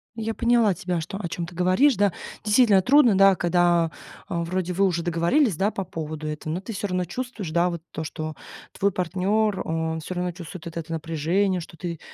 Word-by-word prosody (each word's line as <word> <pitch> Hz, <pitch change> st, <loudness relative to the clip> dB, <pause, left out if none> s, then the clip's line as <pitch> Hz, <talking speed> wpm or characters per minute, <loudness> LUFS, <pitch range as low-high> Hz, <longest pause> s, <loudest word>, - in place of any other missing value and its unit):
Я 225 Hz, 0 st, -3 dB
поняла 235 Hz, -4 st, +3 dB
тебя, 175 Hz, 0 st, -2 dB
что, 195 Hz, +5 st, -6 dB
о 195 Hz, -, -4 dB
чём 170 Hz, 0 st, -4 dB
ты 175 Hz, -, -12 dB
говоришь, 185 Hz, +11 st, +4 dB
да. 205 Hz, -2 st, +3 dB, 0.3 s
Действительно, 210 Hz, -2 st, +5 dB
трудно, 250 Hz, -4 st, +5 dB
да, 195 Hz, -1 st, +6 dB
когда, 175 Hz, -1 st, +2 dB, 0.4 s
э, 175 Hz, -, -3 dB
вроде 180 Hz, +1 st, -2 dB
вы 195 Hz, +2 st, +3 dB
уже 170 Hz, -2 st, 0 dB
договорились, 175 Hz, -, +2 dB
да, 200 Hz, +5 st, +1 dB
по 195 Hz, -, -3 dB
поводу 155 Hz, -3 st, -5 dB
этого, 150 Hz, +1 st, -4 dB
но 180 Hz, -, -2 dB
ты 215 Hz, -, -7 dB
всё 200 Hz, +1 st, -3 dB
равно 180 Hz, -1 st, -1 dB
чувствуешь, 225 Hz, -3 st, -5 dB
да, 175 Hz, +2 st, +2 dB
вот 170 Hz, -2 st, -5 dB
то, 160 Hz, -, -4 dB
что 155 Hz, -1 st, -5 dB, 0.4 s
твой 200 Hz, +1 st, +1 dB
партнер, 190 Hz, +3 st, 0 dB
он 160 Hz, 0 st, -1 dB
всё 185 Hz, -, -5 dB
равно 180 Hz, 0 st, -2 dB
чувствует 175 Hz, 0 st, -9 dB
вот 170 Hz, 0 st, -7 dB
это 165 Hz, 0 st, -5 dB
напряжение, 165 Hz, +4 st, 0 dB
что 165 Hz, -, -12 dB
ты, 170 Hz, -3 st, -5 dB
180 Hz, 210 wpm, -24 LUFS, 165-200 Hz, 0.4 s, да